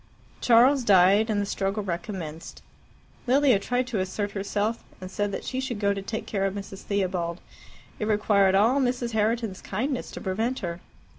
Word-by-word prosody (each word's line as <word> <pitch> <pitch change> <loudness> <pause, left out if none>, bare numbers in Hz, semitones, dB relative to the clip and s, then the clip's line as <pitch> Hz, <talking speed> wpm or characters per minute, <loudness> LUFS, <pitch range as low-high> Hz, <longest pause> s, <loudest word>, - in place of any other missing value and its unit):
Charles 250 +3 +5
died, 200 +1 +5
and 210 -2 +1
the 205 - 0
struggle 200 +1 -2
recommenced. 170 -3 -6 0.6
Lilia 260 -4 +4
tried 245 +5 -1
to 240 -5 -2
assert 200 +2 -2
herself, 205 +3 -2 0.2
and 185 -1 -8
said 205 0 -1
that - - -5
she 260 - -3
should 255 -5 -3
go 200 -1 +2
to 200 - -4
take 220 +3 -5
care 195 -2 -1
of 195 - -4
Mrs. 195 -1 -7
Theobald. 180 -4 -2 0.6
It 210 - -1
required 205 -2 +3
all 230 +8 +4
Mrs. 245 -2 0
Herriton's 220 -2 -1
kindness 250 +6 -3
to - - -8
prevent 225 +7 -1
her. 170 -2 -4
205 Hz, 170 wpm, -26 LUFS, 195-235 Hz, 0.6 s, Charles